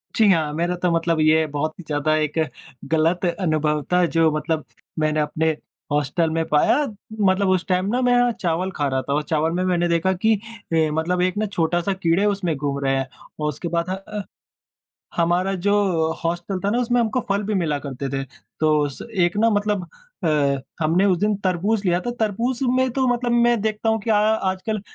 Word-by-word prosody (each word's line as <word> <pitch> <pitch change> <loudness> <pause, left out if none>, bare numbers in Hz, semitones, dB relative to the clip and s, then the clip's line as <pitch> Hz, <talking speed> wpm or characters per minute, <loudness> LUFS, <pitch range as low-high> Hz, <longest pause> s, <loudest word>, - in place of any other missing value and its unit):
जी 220 - +4
हाँ। 155 -4 +1
मेरा 175 +3 -1
तो 180 - +2
मतलब 165 -1 +1
ये 155 +1 +4
बहुत 155 +2 -1
ही - - -8
ज़्यादा 155 0 0
एक 155 0 -1 0.5
गलत 165 +3 +2
अनुभव 155 -4 0
था 180 -1 +4
जो 165 -1 +4
मतलब 155 +1 -1 0.4
मैंने 155 0 +1
अपने 155 +1 0 0.4
हॉस्टल 150 +3 +1
में 165 0 0
पाया। 150 - +4 0.4
मतलब 190 0 +3
उस 185 -1 +1
टाइम 185 0 +1
न 255 - +1
मैं 245 0 +4
चावल 180 +2 0
खा 145 -1 0
रहा 130 -1 0
था 140 +2 -3
और 150 +1 0
चावल 160 0 +1
में 180 - 0
मैंने 175 -1 +1
देखा 170 +3 +1
कि 220 +5 +2
अ, 205 - -10 0.5
मतलब 175 +3 0
एक 185 +2 0
ना 215 - +1
छोटा-सा 175 -1 0
कीड़े 185 +1 +1
उसमें 195 -6 0
घूम 140 0 -2
रहे 135 0 +2
हैं। 135 - -2 0.3
और 150 - -1
उसके 150 +4 -5
बाद 170 +1 -1
ह 185 - 0 0.3
अ, 200 - -4 0.9
हमारा 175 +3 +1
जो 205 0 +3 0.5
हॉस्टल 175 +3 -2
था - - +2
न - - 0
उसमें 245 0 +1
हमको 230 +2 +1
फल 200 +1 +1
भी 215 +1 -2
मिला 165 -6 0
करते 135 0 -4
थे। 135 0 -2 0.4
तो 155 -2 +3
स 135 - -11 0.2
एक 175 -1 +3
न 225 - +3
मतलब 205 -1 0 0.4
अ, 140 -3 +1 0.2
हमने 170 +6 +3
उस 185 -3 +3
दिन 210 0 +1
तरबूज 195 +4 +1
लिया 175 0 +2
था। 240 - -3
तरबूज 230 +4 0 0.2
में 260 0 +2
तो 265 +1 0
मतलब 245 0 0
मैं 240 -1 +3
देखता 220 +1 -1
हूँ 220 0 +1
कि 230 - -4
अ, - - +5
आजकल 210 -1 0
175 Hz, 200 wpm, -22 LUFS, 155-205 Hz, 0.9 s, अ